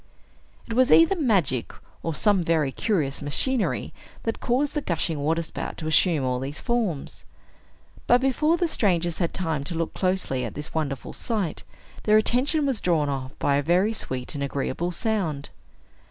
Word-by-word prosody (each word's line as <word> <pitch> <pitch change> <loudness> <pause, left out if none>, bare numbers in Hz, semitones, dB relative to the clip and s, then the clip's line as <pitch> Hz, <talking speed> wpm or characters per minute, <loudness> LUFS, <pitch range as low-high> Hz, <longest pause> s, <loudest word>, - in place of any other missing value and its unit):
It 230 - -4
was 255 +3 +3
either 330 +4 +6
magic 195 - +1 0.3
or 165 -2 -3
some 205 0 +3
very 160 -4 +1
curious 150 -7 -1
machinery 225 - 0 0.3
that 225 - -2
caused 265 +4 0
the 295 - -1
gushing 165 - -1
waterspout 160 +3 -2
to 155 - -6
assume 155 -1 +3
all 125 -1 0
these 135 +3 -4
forms. 225 - -2 0.8
But, 245 - +6
before 285 +5 +2
the 345 - +1
strangers 175 - 0
had 170 -3 0
time 160 -6 -2
to 170 - -3
look 165 0 -2
closely 185 -9 -1
at - - -5
this 150 +1 -6
wonderful 145 -5 -3
sight, 210 -8 -1 0.4
their 215 0 +4
attention 265 +7 +2
was 265 -6 0
drawn 160 -5 +1
off 135 -1 -4
by 140 -1 +2
a - - +2
very 180 +8 +2
sweet 130 - -4
and 140 -1 -3
agreeable 140 +5 -2
sound. 175 -8 -2
170 Hz, 165 wpm, -25 LUFS, 145-225 Hz, 0.8 s, either